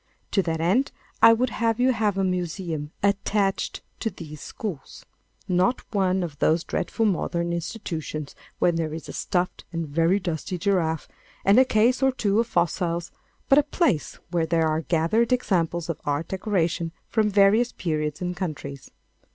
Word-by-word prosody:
To 195 - +3
that 165 -3 -2
end 190 +12 +2 0.3
I 230 - +9
would 245 +2 +1
have 230 -1 0
you 255 +1 +4
have 215 -4 0
a 195 - +2
museum 175 -4 -2
attached 200 0 0 0.2
to 225 - -1
these 155 -6 -10
schools—not 185 - -4
one 190 -2 +2
of 150 -5 -6
those 160 +2 +3
dreadful 225 +6 -1
modern 170 -3 0
institutions 165 -5 -4 0.2
where 175 - +3
there 160 -2 -2
is 160 - -8
a - - -7
stuffed 180 0 -1
and 165 -2 -3
very 165 +6 +2
dusty 180 0 -3
giraffe, 170 -4 0 0.4
and 200 +5 +6
a 260 - +6
case 240 +2 +3
or 265 0 +4
two 210 -4 +1
of 230 - +1
fossils, 170 -2 0 0.4
but 275 - +6
a 295 0 -2
place 270 - +1
where 165 -2 +1
there 165 0 +2
are 155 +1 0
gathered 170 - +1
examples 175 -8 +1
of 165 -3 -4
art 145 +3 -1
decoration 175 -4 -1 0.2
from 220 -2 +2
various 205 +4 +4
periods 155 -3 -2
and 180 0 -2
countries. 145 -6 -5
180 Hz, 160 wpm, -25 LUFS, 165-210 Hz, 0.4 s, I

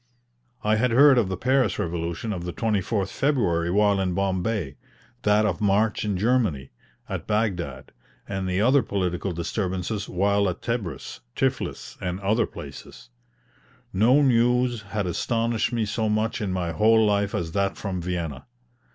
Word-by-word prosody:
I 110 +1 +2
had 125 +3 +2
heard 135 +2 +6
of 105 -5 0
the 95 - -3
Paris 130 -3 +2
revolution 85 +5 -3
of 90 -3 -5
the 90 -1 -5
24th 105 -2 -1
February 95 - +1
while 100 +1 +3
in 90 -2 -1
Bombay; 95 -5 -1 0.5
that 105 +1 +3
of 95 -4 -1
March 105 +1 +2
in 105 -3 -1
Germany, 105 - +1 0.4
at - - -5
Baghdad; 105 -5 -2 0.4
and 95 -1 -3
the 90 +1 0
other 130 +5 +5
political 95 -3 -2
disturbances 95 +3 -3
while 100 +2 +2
at 90 - -6
Tebris, 110 - -4 0.2
Tiflis, - - -2
and 90 0 -3
other 110 +3 +1
places. - - -11 0.8
No 125 +9 +4
news 125 -1 +2
had 105 -1 -3
astonished 115 +6 0
me 115 -2 0
so 110 +1 -1
much 110 +1 0
in 100 -3 -1
my 90 -2 -2
whole 110 +6 +4
life 100 -1 +1
as 80 -1 -2
that 100 +2 0
from 95 -3 -4
Vienna. 85 - -4
100 Hz, 150 wpm, -25 LUFS, 90-115 Hz, 0.8 s, heard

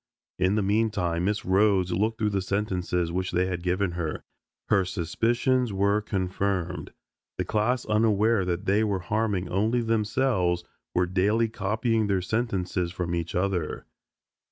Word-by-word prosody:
In 95 +2 +2
the 105 - +1
meantime 100 -5 +1
Miss 105 +1 -1
Rhodes 95 -1 +3
looked 110 +5 0
through 105 -1 0
the 100 -1 0
sentences 90 -3 -1
which 90 +1 -1
they 90 +1 +1
had 90 -2 -3
given 90 +2 0
her. 85 -3 -4 0.5
Her 100 -2 +4
suspicions 115 +8 0
were 100 +2 +2
confirmed. 95 -2 -2 0.5
The - - -1
class, 115 +4 0
unaware 110 -1 +3
that 90 0 -2
they 100 +3 +3
were 100 -3 0
harming 100 0 -1
only 110 +6 +1
themselves, 110 -5 +1 0.3
were 90 - +3
daily 105 +6 +1
copying 110 +1 0
their 95 -2 +1
sentences 95 -5 -1
from 85 -1 -3
each 85 -1 -3
other. 90 -3 -1
100 Hz, 145 wpm, -26 LUFS, 90-110 Hz, 0.5 s, Her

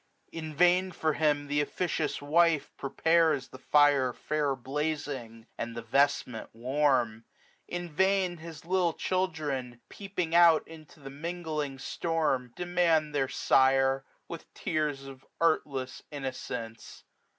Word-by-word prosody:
310 160 -1 -6
In 150 - -13
vain 180 +2 +4
for 160 -3 0
him 145 -1 +1
th* 145 +1 +1
officious 155 -1 -2
wife 160 0 +3
prepares 160 0 +1
The 130 - -12
fire 145 -3 +4
fair 150 -1 -1
blazing, 135 -4 -4
and 115 0 -4
the 115 - -5
vestment 135 -1 +1
warm; 125 -3 +1 0.4
In 175 0 -4
vain 190 +2 +1
his 160 -1 -10
little 180 -1 +1
children, 150 -11 -2
peeping 185 -5 -4
out 170 -2 +6
Into 160 -1 -14
the 135 -1 -9
mingling 155 -2 -4
storm, 135 -4 -1
demand 170 -4 +1
their 135 -2 0
sire. 135 0 +3 0.2
With 170 -2 -9
tears 150 -6 -2
of 135 -1 -11 0.2
artless 140 -6 0
innocence. 125 -5 -6
150 Hz, 125 wpm, -29 LUFS, 135-165 Hz, 0.4 s, out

